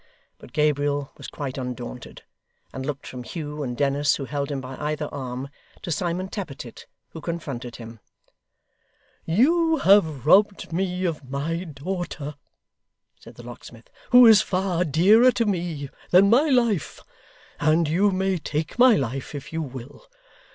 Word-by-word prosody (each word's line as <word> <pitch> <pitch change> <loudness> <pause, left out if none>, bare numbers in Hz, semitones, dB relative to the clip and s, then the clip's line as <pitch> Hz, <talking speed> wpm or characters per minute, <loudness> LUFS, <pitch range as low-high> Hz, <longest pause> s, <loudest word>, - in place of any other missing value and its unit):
But - - -14
Gabriel 145 -2 0
was - - -10
quite 135 -2 -5
undaunted, 125 -1 -7 0.5
and 135 +1 -5
looked 145 -2 -5
from 125 - -7
Hugh 150 +3 -6
and 125 -4 -4
Dennis, 145 +1 +2
who 140 - -5
held 140 +1 -3
him 140 -2 -3
by 130 0 -8
either 150 0 -3
arm, 130 -1 -5 0.3
to 175 - -4
Simon 175 +3 -2
Tappertit, 140 - -8 0.2
who 160 - -10
confronted 140 -8 -5
him. 115 -1 -10 1.3
'You 320 - +3
have 175 - +3
robbed 195 +1 +3
me 185 +1 -1
of 150 -6 -4
my 165 +6 -3
daughter,' 160 -1 -5 0.9
said - - -14
the - - -12
locksmith, - - -12 0.2
'who 250 0 +8
is 220 -3 +8
far 185 -2 -1
dearer 200 - +5
to 230 - 0
me 170 -8 -3 0.2
than 195 +3 +5
my 285 +7 +4
life; 235 - +1 0.6
and 155 +2 +2
you 185 +7 +3
may 190 -1 0
take 155 +7 -4
my 250 -2 +7
life, 135 - -3
if 140 +2 -8
you 160 - -2
will. 130 -3 -9
155 Hz, 150 wpm, -24 LUFS, 140-190 Hz, 1.3 s, who